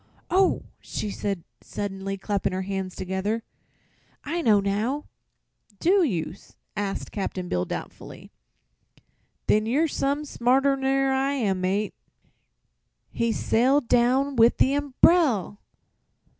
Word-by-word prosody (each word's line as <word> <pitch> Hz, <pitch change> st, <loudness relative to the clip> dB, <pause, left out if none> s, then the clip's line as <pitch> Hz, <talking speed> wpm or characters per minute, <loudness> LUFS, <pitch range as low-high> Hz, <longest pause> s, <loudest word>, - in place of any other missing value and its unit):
"Oh!" 375 Hz, +1 st, +3 dB, 0.2 s
she 210 Hz, -, -4 dB
said 195 Hz, -4 st, -3 dB, 0.2 s
suddenly, 195 Hz, -1 st, -4 dB
clapping 200 Hz, -1 st, -1 dB
her 190 Hz, +1 st, -2 dB
hands 190 Hz, -1 st, -4 dB
together; 190 Hz, +5 st, -2 dB, 0.8 s
"I 335 Hz, +4 st, -2 dB
know 215 Hz, -8 st, +4 dB
now." 215 Hz, +9 st, -1 dB, 0.7 s
"Do 385 Hz, +3 st, +4 dB
you?" 175 Hz, -, -1 dB, 0.4 s
asked 205 Hz, -2 st, -3 dB
Cap'n 190 Hz, -3 st, -4 dB
Bill, 90 Hz, 0 st, 0 dB
doubtfully. -, -, -8 dB, 1.1 s
"Then 215 Hz, +1 st, +2 dB
you're 290 Hz, +8 st, +2 dB
some 285 Hz, 0 st, -1 dB
smarter 270 Hz, +1 st, +2 dB
ner 270 Hz, 0 st, +1 dB
I 270 Hz, +1 st, +1 dB
am, 200 Hz, -9 st, 0 dB
mate." 195 Hz, +2 st, 0 dB, 1.2 s
"He 230 Hz, 0 st, 0 dB
sailed 255 Hz, +5 st, +2 dB
down 255 Hz, +3 st, +2 dB
with 230 Hz, +1 st, +5 dB
the 270 Hz, -, +3 dB
umbrel!" 280 Hz, -, +3 dB
230 Hz, 115 wpm, -25 LUFS, 195-275 Hz, 1.2 s, with